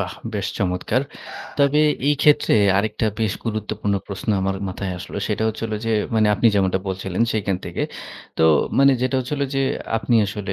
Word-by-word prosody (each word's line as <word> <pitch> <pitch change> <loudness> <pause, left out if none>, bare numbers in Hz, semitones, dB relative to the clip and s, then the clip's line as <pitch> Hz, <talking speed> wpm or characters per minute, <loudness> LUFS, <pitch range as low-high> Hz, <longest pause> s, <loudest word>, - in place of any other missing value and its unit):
বাহ! - - -3 0.2
বেশ - - -1
চমৎকার। 90 +8 0 0.6
তবে 140 +1 +4 0.3
এই 145 - +4
ক্ষেত্রে 150 -5 +4 0.2
আরেকটা 110 +2 -1
বেশ 110 -4 +1
গুরুত্বপূর্ণ 110 -2 -2
প্রশ্ন 100 +1 -7
আমার 95 0 -1
মাথায় 95 0 -4
আসলো - - -8
সেটা 110 0 -1
হচ্ছে 110 - -5
হলো 110 -1 -3
যে 115 - +1 0.2
মানে 110 -1 +4
আপনি 115 - +2
যেমনটা 95 -1 +2
বলছিলেন 95 +1 -2
সেইখান 100 -3 0
থেকে। - - -3 0.6
তো 80 - +4 0.3
মানে 140 0 +6
যেটা 130 +1 0
হচ্ছে 125 +2 -4
হলো 140 - 0
যে 135 - +2 0.3
আপনি 115 +2 0
আসলে 100 -1 -4
110 Hz, 175 wpm, -22 LUFS, 95-120 Hz, 0.6 s, মানে